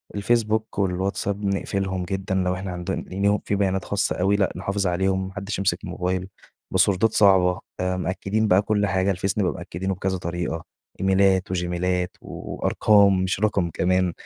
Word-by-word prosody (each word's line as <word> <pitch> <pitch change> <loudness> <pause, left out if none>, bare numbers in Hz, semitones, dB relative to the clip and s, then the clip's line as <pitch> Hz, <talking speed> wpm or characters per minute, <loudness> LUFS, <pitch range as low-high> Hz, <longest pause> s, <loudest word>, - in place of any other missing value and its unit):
الفيسبوك 110 0 0
والواتساب 100 +2 -1
نقفلهم 95 -1 -1
جدًا 95 +1 -3
لو 90 -1 +1
إحنا 95 0 -5
عندن 90 0 -4
يعني 100 +2 +1
في 100 - 0
بيانات 95 -1 0
خاصَّة 100 +2 0
أوي، 100 +3 +3
لأ، 100 -2 +1
نحافظ 100 +1 -1
عليهم 95 +1 0
ما 95 - -10
حَدِّش 100 0 -4
يمسك 95 0 0
الموبايل، 90 0 -2 0.4
باسوردات 100 +3 +3
صعبة، 95 -3 +4 0.2
آآ 90 0 0
مأكدين 100 +4 -1
بقى 95 +1 +5
كُلّ 105 -1 +1
حاجة، 95 +1 +1
الفيس 95 +3 -1
نبقى 95 -4 +2
مأكدينه 90 +2 -4
بكذا 95 0 -2
طريقة 85 -1 -4 0.4
إيميلات 95 -1 +2
وجيميلات 90 0 -1
و - - -7
وأرقام 100 -3 +4
مش 95 0 -1
رقم 100 -4 +1
كمان، 90 +1 +1
95 Hz, 160 wpm, -24 LUFS, 90-100 Hz, 0.4 s, بقى